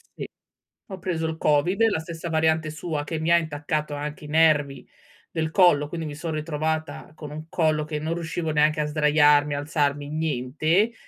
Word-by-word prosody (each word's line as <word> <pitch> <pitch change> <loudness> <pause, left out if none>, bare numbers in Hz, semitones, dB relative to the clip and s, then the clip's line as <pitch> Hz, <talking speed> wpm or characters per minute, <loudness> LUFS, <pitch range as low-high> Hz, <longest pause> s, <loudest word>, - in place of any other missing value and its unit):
Sì. - - -6 0.6
Ho 190 -2 -7
preso 170 -3 -2
il 160 0 -3
COVID, 165 +9 +2
la 205 - 0
stessa 165 +1 -6
variante 160 -1 +1
sua, 155 -1 -4
che 160 +2 -4
mi 160 +2 -1
ha 170 - +7
intaccato 150 -1 -3
anche 150 +1 -6
i - - -9
nervi 150 -3 +2 0.4
del 160 -1 -2
collo, 160 -5 +4
quindi 165 0 -5
mi 150 - -6
son 160 +2 -5
ritrovata 155 0 -3
con 150 -2 -9
un 155 +1 -8
collo 155 -3 +1
che 155 -1 -4
non 160 +2 -2
riuscivo 170 -1 -3
neanche 150 0 +2
a - - +1
sdraiarmi, 150 -1 +3
alzarmi, 145 -1 -1
niente. 155 - 0
155 Hz, 180 wpm, -24 LUFS, 150-160 Hz, 0.6 s, ha